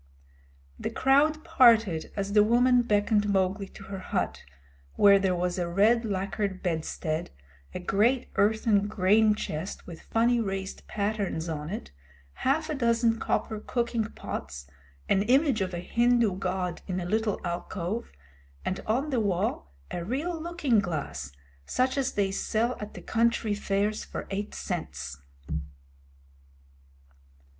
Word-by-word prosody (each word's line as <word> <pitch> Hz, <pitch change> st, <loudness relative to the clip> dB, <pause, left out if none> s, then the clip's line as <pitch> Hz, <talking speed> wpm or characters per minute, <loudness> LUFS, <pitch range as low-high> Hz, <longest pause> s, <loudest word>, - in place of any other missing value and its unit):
The -, -, -2 dB
crowd 300 Hz, +3 st, +3 dB
parted 230 Hz, -, +4 dB
as 200 Hz, 0 st, -2 dB
the 210 Hz, -1 st, +7 dB
woman 245 Hz, +3 st, +4 dB
beckoned 210 Hz, -2 st, +2 dB
Mowgli 195 Hz, 0 st, +1 dB
to 195 Hz, -, -13 dB
her 195 Hz, 0 st, -6 dB
hut, 185 Hz, -, -2 dB, 0.5 s
where 200 Hz, -1 st, +7 dB
there 190 Hz, -2 st, +1 dB
was 180 Hz, +1 st, -1 dB
a 175 Hz, -, -1 dB
red 220 Hz, +6 st, +3 dB
lacquered 195 Hz, -1 st, -2 dB
bedstead, 160 Hz, -1 st, -2 dB, 0.5 s
a -, -, -2 dB
great 220 Hz, +8 st, +1 dB
earthen 210 Hz, -1 st, +3 dB
grain 210 Hz, +2 st, +4 dB
chest 165 Hz, -2 st, -5 dB
with 170 Hz, -3 st, -9 dB
funny 235 Hz, +1 st, +2 dB
raised 195 Hz, -2 st, -4 dB
patterns 200 Hz, -5 st, -2 dB
on 155 Hz, -1 st, -4 dB
it, 210 Hz, -, -6 dB, 0.4 s
half 305 Hz, +4 st, 0 dB
a 310 Hz, -, -2 dB
dozen 235 Hz, -3 st, +2 dB
copper 220 Hz, -1 st, -1 dB
cooking 235 Hz, 0 st, -1 dB
pots, 70 Hz, -, -6 dB, 0.4 s
an 195 Hz, -, +3 dB
image 260 Hz, +1 st, +3 dB
of 185 Hz, -1 st, -1 dB
a 175 Hz, -, -4 dB
Hindu 235 Hz, +1 st, +2 dB
god 185 Hz, -1 st, -2 dB
in 185 Hz, -1 st, -2 dB
a 175 Hz, -, -4 dB
little 215 Hz, +2 st, 0 dB
alcove, 175 Hz, +4 st, -3 dB, 0.5 s
and 185 Hz, -, -1 dB
on 265 Hz, +7 st, 0 dB
the 255 Hz, -, +2 dB
wall 190 Hz, -, -1 dB, 0.2 s
a 175 Hz, -, -3 dB
real 310 Hz, -, -2 dB
looking 315 Hz, -9 st, +1 dB
glass, 150 Hz, -, -3 dB, 0.4 s
such 260 Hz, +1 st, +1 dB
as 275 Hz, -2 st, 0 dB
they 195 Hz, -2 st, +1 dB
sell 225 Hz, +5 st, 0 dB
at 210 Hz, 0 st, -7 dB
the -, -, -9 dB
country 230 Hz, -2 st, +1 dB
fairs. 205 Hz, +1 st, -1 dB
210 Hz, 135 wpm, -28 LUFS, 185-235 Hz, 0.5 s, the